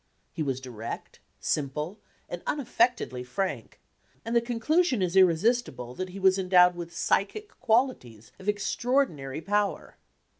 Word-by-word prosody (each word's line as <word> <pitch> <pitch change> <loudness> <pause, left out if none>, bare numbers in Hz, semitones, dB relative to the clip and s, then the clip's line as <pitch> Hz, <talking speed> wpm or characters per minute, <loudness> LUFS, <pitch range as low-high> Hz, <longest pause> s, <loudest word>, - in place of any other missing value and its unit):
He 165 - -4
was 135 -4 -1
direct, 120 -4 -7 0.2
simple, 150 +7 -2 0.3
and 175 - -6
unaffectedly 240 - 0
frank, 185 +10 -4 0.5
and 230 +1 -2
the 235 - +5
conclusion 250 +5 +1
is 180 -1 0
irresistible 185 - +2
that 185 +7 -4
he 185 - -9
was 190 0 +4
en 185 -1 -3
dowed 180 -1 +7
with 170 -1 -6
psychic 415 - 0
qualities 220 - 0
of 195 +2 -3
extraordinary 205 - 0
power. 205 +3 -1
190 Hz, 135 wpm, -28 LUFS, 150-235 Hz, 0.5 s, dowed